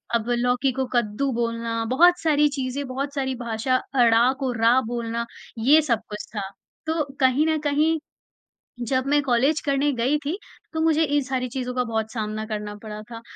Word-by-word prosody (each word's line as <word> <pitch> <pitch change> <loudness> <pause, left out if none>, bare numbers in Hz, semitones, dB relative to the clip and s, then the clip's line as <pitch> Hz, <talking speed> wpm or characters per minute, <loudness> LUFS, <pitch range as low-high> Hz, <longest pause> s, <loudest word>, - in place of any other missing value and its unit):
अब 230 +1 -1
लौकी 245 +2 +1
को 265 +1 -2
कद्दू 240 +3 0
बोलना, 230 -1 -2
बहुत 350 +7 +5
सारी 300 -2 +3
चीज़ें, 275 0 -3
बहुत 275 +2 -4
सारी 265 -2 -1
भाषा, 235 +1 -1 0.2
अड़ा 235 0 +5
को 265 -2 -1
रा 235 +2 +4
बोलना, 235 0 -3 0.3
ये 280 +8 +5
सब 245 -8 +1
कुछ 210 0 -6
था। 195 -2 -3 0.4
तो 320 0 0 0.2
कहीं 265 +3 +3
न 315 - +2
कहीं, 305 +2 +2 0.9
जब 260 +1 +1
मैं 290 +1 +3
कॉलेज 270 +4 +2
करने 280 0 +1
गई 255 +5 +1
थी 325 +6 -1 0.4
तो 320 - -1
मुझे 320 0 +3
इन 290 -1 +1
सारी 255 -1 -2
चीज़ों 250 0 -4
का 250 - +1
बहुत 220 -2 -2
सामना 215 -1 -3
करना 210 -1 -5
पड़ा 215 -1 -7
था, 230 - -7
255 Hz, 180 wpm, -24 LUFS, 230-285 Hz, 0.9 s, बहुत